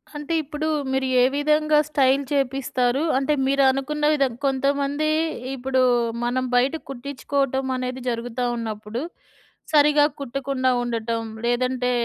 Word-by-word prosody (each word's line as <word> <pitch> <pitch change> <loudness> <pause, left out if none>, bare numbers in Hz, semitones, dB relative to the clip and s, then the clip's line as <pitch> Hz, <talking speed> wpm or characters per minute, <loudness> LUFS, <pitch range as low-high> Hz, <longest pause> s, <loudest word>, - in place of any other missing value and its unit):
అంటే, 295 +3 -4
ఇప్పుడు 305 +2 -4 0.2
మీరు 265 0 0
ఏ - - +6
విధంగా 300 +1 +2
స్టైల్ 275 -1 +3
చేపిస్తారు? 270 0 0
అంటే 275 +3 +1
మీరనుకున్న 275 +2 +1
విధం 275 -4 +1
కొంతమంది 280 +2 0 0.5
ఇప్పుడు 260 0 0 0.4
మనం 255 +2 0
బయట 260 +5 +3
కుట్టించుకోవటమనేది 265 -1 -2
జరుగుతా 240 +1 -3
ఉన్నప్పుడు, 220 +1 -5 0.7
సరిగ్గా 295 0 +5
కుట్టకుండా 270 0 -1
ఉండటం, 230 -1 -2 0.2
లేదంటే 250 +1 0
265 Hz, 105 wpm, -23 LUFS, 250-285 Hz, 0.7 s, ఏ